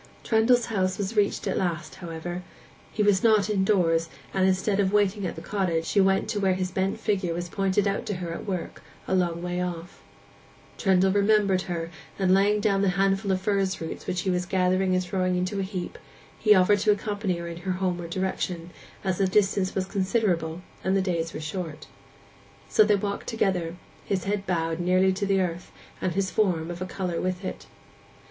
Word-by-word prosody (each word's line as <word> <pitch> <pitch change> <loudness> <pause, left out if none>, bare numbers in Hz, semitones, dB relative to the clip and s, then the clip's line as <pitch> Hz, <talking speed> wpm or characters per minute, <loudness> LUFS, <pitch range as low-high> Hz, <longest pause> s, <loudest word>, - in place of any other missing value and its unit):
Trendle's 235 +2 +3
house 190 -4 0
was 205 +2 -3
reached 205 -1 +1
at - - 0
last, 170 -4 -2
however: 175 +1 -5 0.5
he 210 - 0
was 200 -2 +3
not 215 -2 +4
indoors, 180 -5 +2 0.2
and 190 -1 +3
instead 190 +2 +1
of 195 -1 +2
waiting 205 -1 +2
at - - -5
the - - -8
cottage, 180 -5 -1
she 200 - +3
went 195 0 +2
to 215 -2 -1
where 190 -2 +2
his 185 0 -2
bent 190 +1 -1
figure 190 -5 0
was 175 +1 -3
pointed 195 +2 +1
out 195 - -2
to 205 - -2
her 175 -2 -4
at 170 - -7
work 185 -4 -4 0.3
a - - -1
long 175 -2 0
way 180 0 -2
off. 180 0 -5 0.7
Trendle 190 -1 +3
remembered 200 -2 +3
her, 170 -1 -3 0.3
and 185 -2 +3
laying 205 +2 +4
down 200 -2 +2
the 200 - +3
handful 195 +1 +2
of 185 0 0
furze 195 -2 0
roots 160 - -6
which 180 - -1
he 190 - 0
was 180 0 -1
gathering 185 0 +2
and 185 - +1
throwing 185 0 0
into 185 +3 -1
a - - +1
heap, 190 -2 -5 0.4
he 210 -1 +6
offered 195 +2 +4
to 210 - +1
accompany 205 -2 0
her 170 0 -5
in 170 0 -6
her 185 +2 -2
homeward 180 -2 -2
direction, 180 -1 -3 0.3
as 190 -1 -1
the 195 - +3
distance 195 -1 +1
was 190 - 0
considerable 185 -4 0 0.2
and 190 +1 +2
the - - +2
days 170 -3 -1
were - - -6
short. 155 -1 -5 0.8
So - - +5
they 210 0 +4
walked 200 0 -3
together, 180 -7 0 0.3
his 190 -3 -1
head 200 0 -2
bowed 165 -2 -1
nearly 185 +2 +3
to 200 +1 -2
the 195 -1 +3
earth, 175 -1 -3 0.3
and 180 - 0
his 190 -1 0
form 175 -6 +1
of 175 +1 -7
a 185 - -2
colour 180 -3 -3
with 185 +1 -2
it. - - -6
190 Hz, 200 wpm, -26 LUFS, 175-200 Hz, 0.8 s, he